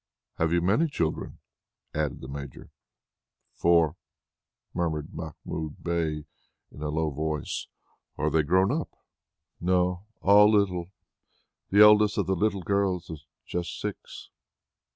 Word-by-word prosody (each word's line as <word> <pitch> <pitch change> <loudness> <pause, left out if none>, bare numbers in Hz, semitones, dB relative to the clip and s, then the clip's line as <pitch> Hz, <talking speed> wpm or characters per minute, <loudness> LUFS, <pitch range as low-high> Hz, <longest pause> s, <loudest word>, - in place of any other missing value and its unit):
"Have 80 0 +2
you 85 0 +3
many 110 - +3
children?" 80 - -3 0.6
added 75 -3 -2
the 65 - -8
Major. 70 -1 -8 0.8
"Four," 85 -3 +3 0.8
murmured 80 -4 -2
Mahmoud 80 -1 -6
Bey 80 -3 -1 0.5
in - - -12
a 75 - -2
low 80 +1 0
voice. 75 0 -3 0.5
"Are 75 0 0
they 80 +1 +4
grown 95 +6 +3
up?" - - -2 0.7
"No, 90 +2 +1
all 105 +1 +7
little. 90 -4 +1 0.8
The 100 +2 +5
eldest 105 0 +7
of 100 - +1
the 95 +2 0
little 100 0 0
girls 95 -3 0
is 75 -2 -10 0.2
just 85 -1 -4
six." - - -7
85 Hz, 125 wpm, -27 LUFS, 75-95 Hz, 0.8 s, all